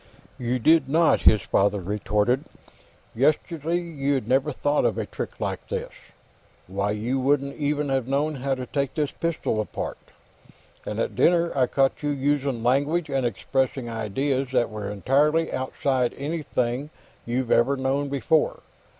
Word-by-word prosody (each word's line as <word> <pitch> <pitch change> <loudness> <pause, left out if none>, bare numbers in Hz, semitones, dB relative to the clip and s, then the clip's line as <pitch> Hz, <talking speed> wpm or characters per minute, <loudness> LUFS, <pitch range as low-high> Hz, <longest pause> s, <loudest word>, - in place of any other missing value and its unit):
"You 125 0 0
did 145 +3 +4
not," 165 +3 +4
his 110 - +5
father 100 +1 +2
retorted. 105 - 0 0.7
"Yesterday 155 +5 +1
you'd 140 -8 -2
never 135 +4 +2
have 140 - -5
thought 145 +1 +1
of - - +1
a - - -1
trick - - -6
like - - -3
this; - - -4 0.7
why, 100 +2 -2
you 115 +6 -1
wouldn't 140 +1 +1
even 145 -1 -1
have 135 -2 0
known 145 +3 0
how 135 +1 -1
to 130 -1 -5
take 140 0 -2
this 150 -2 0
pistol 165 -9 -1
apart. 105 - -5 0.9
And - - -3
at - - -1
dinner, 170 -1 +3
I 130 -2 +3
caught 135 +3 +1
you 145 - -1
using 140 -3 0
language 145 +6 +1
and 135 -3 +1
expressing 130 +2 -1
ideas 130 +5 -1
that 120 -3 +2
were 105 -2 -5
entirely 145 +10 +2
outside 130 -1 0
anything 140 -3 -2 0.4
you'd 120 0 -1
ever 135 +4 +3
known 135 +2 0
before. 145 +3 +1
135 Hz, 150 wpm, -25 LUFS, 120-145 Hz, 0.9 s, his